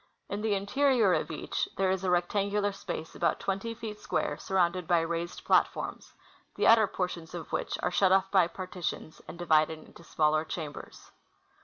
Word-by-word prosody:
In 205 Hz, -, -3 dB
the 215 Hz, -2 st, +1 dB
interior 220 Hz, +1 st, +3 dB
of -, -, 0 dB
each 155 Hz, -, -3 dB
there 190 Hz, -1 st, +2 dB
is 190 Hz, 0 st, -1 dB
a 185 Hz, -, 0 dB
rectangular 200 Hz, +3 st, +1 dB
space 180 Hz, -5 st, -6 dB
about -, -, 0 dB
twenty 195 Hz, +4 st, -3 dB
feet 215 Hz, -2 st, -7 dB
square -, -, -1 dB
sur 190 Hz, -, -6 dB
rounded 180 Hz, -1 st, +2 dB
by 170 Hz, -1 st, +4 dB
raised 170 Hz, +1 st, -4 dB
platforms, -, -, +1 dB, 0.4 s
the -, -, 0 dB
outer 225 Hz, -2 st, +7 dB
portions 180 Hz, -3 st, -4 dB
of 170 Hz, -, -7 dB
which -, -, -2 dB
are -, -, +1 dB
shut 185 Hz, +1 st, +3 dB
off 190 Hz, 0 st, +3 dB
by 185 Hz, -4 st, +5 dB
partitions 180 Hz, -3 st, -6 dB
and -, -, -8 dB
divided 160 Hz, -2 st, +2 dB
into 155 Hz, -, -16 dB
smaller 155 Hz, -1 st, +1 dB
chambers. 155 Hz, -2 st, -8 dB
185 Hz, 175 wpm, -29 LUFS, 170-200 Hz, 0.4 s, outer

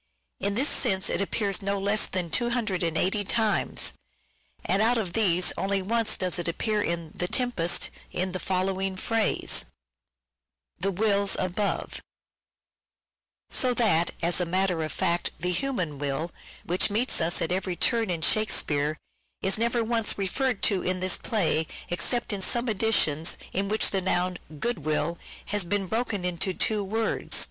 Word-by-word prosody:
In 200 Hz, +1 st, 0 dB
this 265 Hz, +6 st, +3 dB
sense 190 Hz, -7 st, +2 dB
it -, -, 0 dB
appears 200 Hz, 0 st, 0 dB
no 200 Hz, 0 st, -1 dB
less 200 Hz, +2 st, +1 dB
than 180 Hz, -3 st, -3 dB
280 205 Hz, -5 st, 0 dB
times, 215 Hz, -2 st, +1 dB, 0.7 s
and 195 Hz, +3 st, +2 dB
out 235 Hz, +2 st, +3 dB
of 190 Hz, -6 st, -2 dB
these 185 Hz, -5 st, +3 dB
only 195 Hz, 0 st, 0 dB
once 225 Hz, +2 st, +1 dB
does 185 Hz, -1 st, +1 dB
it 175 Hz, -, -2 dB
appear 210 Hz, +5 st, 0 dB
in 170 Hz, -4 st, -2 dB
" -, -, -20 dB
The 180 Hz, -, -1 dB
Tempest," 210 Hz, -8 st, 0 dB, 0.2 s
in 185 Hz, +1 st, -2 dB
the 185 Hz, -, -3 dB
following 190 Hz, +1 st, -1 dB
phrase, 225 Hz, +3 st, 0 dB, 0.5 s
" -, -, -54 dB
the 195 Hz, -, +1 dB
wills 200 Hz, 0 st, +2 dB
above 185 Hz, +3 st, -2 dB, 0.8 s
"; -, -, -68 dB, 0.7 s
so 250 Hz, -2 st, +2 dB
that, 175 Hz, -9 st, +3 dB
as 175 Hz, +2 st, +3 dB
a -, -, +2 dB
matter 185 Hz, -1 st, +1 dB
of 155 Hz, -, -3 dB
fact, 175 Hz, -2 st, 0 dB
the 180 Hz, +2 st, -1 dB
human 180 Hz, -, -1 dB
will, 145 Hz, +4 st, -2 dB, 0.3 s
which 180 Hz, +2 st, +1 dB
meets 220 Hz, 0 st, +1 dB
us 165 Hz, +1 st, +2 dB
at 165 Hz, -, -1 dB
every 185 Hz, 0 st, -1 dB
turn 230 Hz, +2 st, +1 dB
in 165 Hz, -3 st, -2 dB
Shakespeare, 155 Hz, -8 st, +2 dB, 0.5 s
is 195 Hz, +2 st, +1 dB
never 235 Hz, 0 st, +1 dB
once 225 Hz, -1 st, 0 dB
referred 205 Hz, +4 st, -1 dB
to 195 Hz, -3 st, +2 dB
in 185 Hz, 0 st, -1 dB
this 185 Hz, -1 st, +2 dB
play 170 Hz, -8 st, +1 dB, 0.2 s
except 215 Hz, +7 st, +1 dB
in 200 Hz, -, -3 dB
some 235 Hz, +6 st, +1 dB
editions 190 Hz, -8 st, +1 dB, 0.2 s
in 195 Hz, +1 st, -1 dB
which 215 Hz, +1 st, +2 dB
the 195 Hz, -, 0 dB
noun 180 Hz, 0 st, 0 dB
" 155 Hz, -2 st, -12 dB
good 240 Hz, +4 st, -1 dB
will 155 Hz, +3 st, -1 dB
" -, -, -17 dB
has 205 Hz, -1 st, +2 dB
been 195 Hz, +3 st, -1 dB
broken 220 Hz, -2 st, -2 dB
into 180 Hz, +1 st, -1 dB
two 215 Hz, -2 st, 0 dB
words. 220 Hz, +3 st, -1 dB
190 Hz, 165 wpm, -27 LUFS, 175-215 Hz, 0.8 s, this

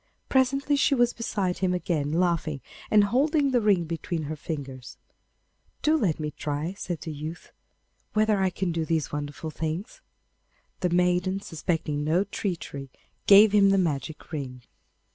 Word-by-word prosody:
Presently 275 Hz, +2 st, +2 dB
she 280 Hz, -, +3 dB
was 240 Hz, -1 st, +3 dB
beside 200 Hz, -5 st, -2 dB
him 185 Hz, -1 st, +1 dB
again 155 Hz, -5 st, -1 dB
laughing, 165 Hz, -3 st, 0 dB, 0.3 s
and 210 Hz, -1 st, +6 dB
holding 280 Hz, +6 st, +2 dB
the 245 Hz, -2 st, +3 dB
ring 200 Hz, -5 st, +3 dB
between 165 Hz, 0 st, -3 dB
her 155 Hz, +2 st, -4 dB
fingers. 135 Hz, -5 st, -7 dB, 0.9 s
'Do 310 Hz, +1 st, +4 dB
let 190 Hz, -, +1 dB
me 150 Hz, -1 st, -3 dB
try,' 150 Hz, +3 st, -3 dB
said 175 Hz, -4 st, -5 dB
the 160 Hz, -, -5 dB
youth, 155 Hz, +3 st, -7 dB, 0.6 s
'whether 215 Hz, -2 st, +2 dB
I 190 Hz, -, +3 dB
can 180 Hz, 0 st, -2 dB
do 165 Hz, -1 st, -1 dB
these 160 Hz, -2 st, -1 dB
wonderful 145 Hz, +2 st, -5 dB
things.' 160 Hz, +8 st, -4 dB, 0.8 s
The 180 Hz, -, +1 dB
maiden, 180 Hz, +2 st, +2 dB
suspecting 160 Hz, -4 st, -2 dB
no 165 Hz, +5 st, +2 dB
treachery, 170 Hz, -9 st, -5 dB, 0.4 s
gave 205 Hz, +1 st, +8 dB
him 200 Hz, -1 st, +5 dB
the 195 Hz, -, +4 dB
magic 155 Hz, -4 st, -2 dB
ring. 130 Hz, -5 st, -5 dB
175 Hz, 150 wpm, -26 LUFS, 155-205 Hz, 0.9 s, gave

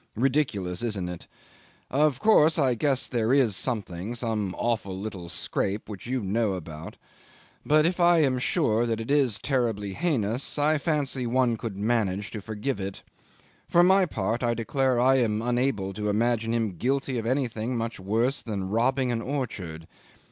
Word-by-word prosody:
Ridiculous, 115 Hz, -8 st, 0 dB
isn't 105 Hz, -7 st, -2 dB
it? 90 Hz, -1 st, -8 dB, 0.6 s
Of 145 Hz, -1 st, +2 dB
course 160 Hz, -6 st, +5 dB
I 135 Hz, -5 st, +3 dB
guess 135 Hz, +2 st, +1 dB
there 115 Hz, -2 st, 0 dB
is 130 Hz, -7 st, +3 dB
something 105 Hz, -2 st, -3 dB
some 110 Hz, -5 st, -2 dB
awful 105 Hz, -5 st, -2 dB
little 95 Hz, -4 st, -6 dB
scrape 100 Hz, +5 st, -2 dB
which 105 Hz, 0 st, -8 dB
you 130 Hz, 0 st, -1 dB
know 105 Hz, +1 st, 0 dB
all -, -, -3 dB
about 80 Hz, -2 st, -9 dB, 0.7 s
but 155 Hz, +1 st, +4 dB
if 175 Hz, +2 st, 0 dB
I 175 Hz, 0 st, +5 dB
am 130 Hz, -3 st, +1 dB
sure 120 Hz, -5 st, +1 dB
that 115 Hz, -1 st, -1 dB
it 115 Hz, +4 st, -4 dB
is 135 Hz, -7 st, +2 dB
terribly 115 Hz, -7 st, -1 dB
heinous, 130 Hz, -, 0 dB
I 150 Hz, +1 st, +2 dB
fancy 140 Hz, -5 st, -1 dB
one 125 Hz, -1 st, +2 dB
could 110 Hz, -3 st, -6 dB
manage 105 Hz, -2 st, 0 dB
to 110 Hz, -, -6 dB
forgive 110 Hz, +3 st, -3 dB
it. 95 Hz, 0 st, -6 dB, 0.7 s
For 175 Hz, -, +5 dB
my 190 Hz, +1 st, +5 dB
part, 115 Hz, -, -2 dB
I 120 Hz, -1 st, +1 dB
declare 130 Hz, +2 st, 0 dB
I 130 Hz, +2 st, +4 dB
am 110 Hz, -4 st, +1 dB
unable 120 Hz, -5 st, 0 dB
to 105 Hz, +2 st, -2 dB
imagine 115 Hz, +1 st, +1 dB
him 110 Hz, -6 st, -1 dB
guilty 135 Hz, +3 st, -1 dB
of 115 Hz, -, -4 dB
anything 125 Hz, -2 st, -1 dB
much 115 Hz, -2 st, -3 dB
worse 115 Hz, +8 st, 0 dB
than 100 Hz, -4 st, -4 dB
robbing 125 Hz, +3 st, +1 dB
an 115 Hz, -1 st, -1 dB
orchard. 100 Hz, -, -4 dB
115 Hz, 170 wpm, -26 LUFS, 105-135 Hz, 0.7 s, course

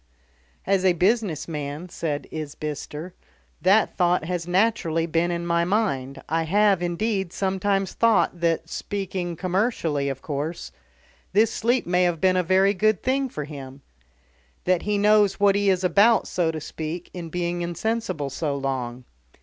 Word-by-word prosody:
"As 195 Hz, -1 st, +2 dB
a 185 Hz, -1 st, +4 dB
business 190 Hz, -1 st, +1 dB
man," 150 Hz, +1 st, -5 dB
said 150 Hz, -4 st, -3 dB
Isbister, 150 Hz, +2 st, -6 dB, 0.5 s
"that 200 Hz, +4 st, +3 dB
thought 175 Hz, -2 st, +2 dB
has 175 Hz, 0 st, -3 dB
naturally 180 Hz, -4 st, +1 dB
been 170 Hz, +1 st, 0 dB
in 170 Hz, 0 st, -2 dB
my 170 Hz, 0 st, +2 dB
mind. 170 Hz, -9 st, -1 dB
I 165 Hz, +1 st, 0 dB
have, 195 Hz, +3 st, +3 dB
indeed, 190 Hz, +1 st, -1 dB
sometimes 195 Hz, 0 st, 0 dB
thought 185 Hz, -6 st, +2 dB
that, 165 Hz, -1 st, 0 dB
speaking 185 Hz, -2 st, -4 dB
commercially, 175 Hz, -, 0 dB
of 135 Hz, -1 st, -6 dB
course, 150 Hz, -, -4 dB, 0.6 s
this 220 Hz, +3 st, +4 dB
sleep 240 Hz, +3 st, +1 dB
may 180 Hz, 0 st, +3 dB
be 175 Hz, +3 st, +2 dB
a 185 Hz, 0 st, +2 dB
very 190 Hz, +3 st, +3 dB
good 215 Hz, +1 st, +1 dB
thing 265 Hz, +1 st, +1 dB
for 150 Hz, -, -5 dB
him. 140 Hz, -2 st, -9 dB, 0.8 s
That 185 Hz, -1 st, +2 dB
he 210 Hz, 0 st, 0 dB
knows 210 Hz, -1 st, +4 dB
what 200 Hz, -1 st, +5 dB
he 200 Hz, 0 st, +2 dB
is 190 Hz, -1 st, +1 dB
about, 205 Hz, +5 st, +4 dB
so 175 Hz, -3 st, 0 dB
to 160 Hz, -1 st, -3 dB
speak, 160 Hz, +3 st, -6 dB
in 170 Hz, -2 st, -6 dB
being 175 Hz, +1 st, -2 dB
insensible 175 Hz, -3 st, -2 dB
so 145 Hz, +1 st, -2 dB
long. 130 Hz, -3 st, -3 dB
175 Hz, 150 wpm, -24 LUFS, 160-200 Hz, 0.8 s, what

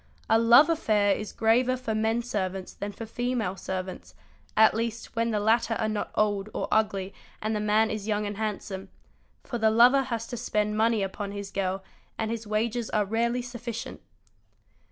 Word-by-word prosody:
A 225 Hz, -, +4 dB
love 235 Hz, +6 st, +7 dB
affair 215 Hz, -11 st, +2 dB
is 210 Hz, -, -5 dB
graver 245 Hz, +3 st, +2 dB
for 245 Hz, -3 st, -3 dB
men 220 Hz, +2 st, +1 dB
servants 190 Hz, -5 st, -3 dB
than 205 Hz, 0 st, -5 dB
for 225 Hz, -, -8 dB
female 240 Hz, -4 st, -2 dB
servants—at 190 Hz, +3 st, -1 dB
least 230 Hz, 0 st, -4 dB
when 230 Hz, 0 st, +1 dB
the 215 Hz, -2 st, 0 dB
latter 225 Hz, +2 st, +2 dB
are 220 Hz, -, -1 dB
not 215 Hz, -1 st, -2 dB
old 205 Hz, -1 st, +1 dB
or -, -, -2 dB
ugly 195 Hz, -3 st, +1 dB, 0.3 s
and 215 Hz, +1 st, -2 dB
the -, -, 0 dB
man 215 Hz, +1 st, +2 dB
is 215 Hz, -1 st, -4 dB
young 210 Hz, -1 st, 0 dB
and 205 Hz, -1 st, -4 dB
handsome; 200 Hz, -3 st, -4 dB, 0.3 s
| -, -, -39 dB
for 240 Hz, -, -4 dB
the 220 Hz, 0 st, +4 dB
lover 245 Hz, +5 st, +6 dB
has 230 Hz, -4 st, -3 dB
to 245 Hz, -, -4 dB
spend 210 Hz, -2 st, -1 dB
money 220 Hz, -1 st, +2 dB
upon 200 Hz, +1 st, -4 dB
his 200 Hz, -1 st, -6 dB
girl 190 Hz, 0 st, -2 dB, 0.3 s
and 220 Hz, 0 st, -2 dB
his 230 Hz, -1 st, -4 dB
wages 225 Hz, +2 st, -1 dB
are 210 Hz, -1 st, +1 dB
rarely 235 Hz, +4 st, 0 dB
] 245 Hz, 0 st, -9 dB
sufficient. 235 Hz, -1 st, -6 dB
220 Hz, 185 wpm, -27 LUFS, 205-230 Hz, 0.3 s, love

